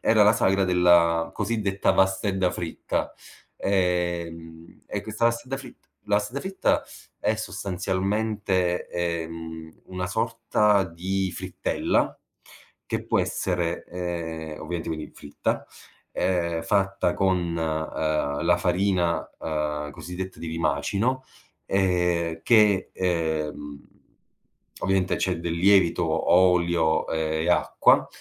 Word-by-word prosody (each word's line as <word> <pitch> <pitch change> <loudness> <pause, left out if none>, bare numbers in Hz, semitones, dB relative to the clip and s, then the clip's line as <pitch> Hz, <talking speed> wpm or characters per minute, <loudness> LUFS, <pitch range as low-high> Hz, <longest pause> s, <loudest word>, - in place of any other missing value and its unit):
era 110 -1 +4
la 105 +1 +6
sagra 95 -2 +2
della 85 -2 +4
cosiddetta 105 -2 0
vastedda 95 -1 +2
fritta. 85 -2 -3 0.4
Ehm, 85 -3 -2
e - - -4
questa 110 +2 -2
vastedda 120 +3 -1
fritt 135 - -12 0.2
la 105 - +4
vastedda 105 +6 -2
fritta 190 +3 0 0.3
è - - +1
sostanzialmente, 95 -1 -1
ehm, 80 -2 -4
una 90 0 -4
sorta 110 -2 +2
di 95 +2 -2
frittella, 95 0 -1 0.7
che - - -3
può - - +1
essere, 85 -2 -1
ehm, 85 -3 -4
ovviamente 85 +1 -4
quindi 80 -1 -4
fritta, 75 - -3 0.5
ehm, 85 -3 0
fatta 100 0 +1
con, 95 -1 +2 0.2
uhm, 80 -2 -1
la - - +4
farina, 90 -1 +1
uhm, 75 -1 -2
cosiddetta 90 +4 -7
di 85 - -5
rimacino, 100 +10 0 0.4
ehm, 90 -3 +1
che, 105 -4 +4
ehm, 80 -5 -2 0.9
ovviamente 95 -1 +1
c'è 90 -3 0
del 85 0 -2
lievito, 90 -1 +4
o 80 +1 +2 0.2
olio 85 -2 +1
e 80 +1 -1
acqua, - - +4
90 Hz, 105 wpm, -25 LUFS, 80-95 Hz, 0.9 s, la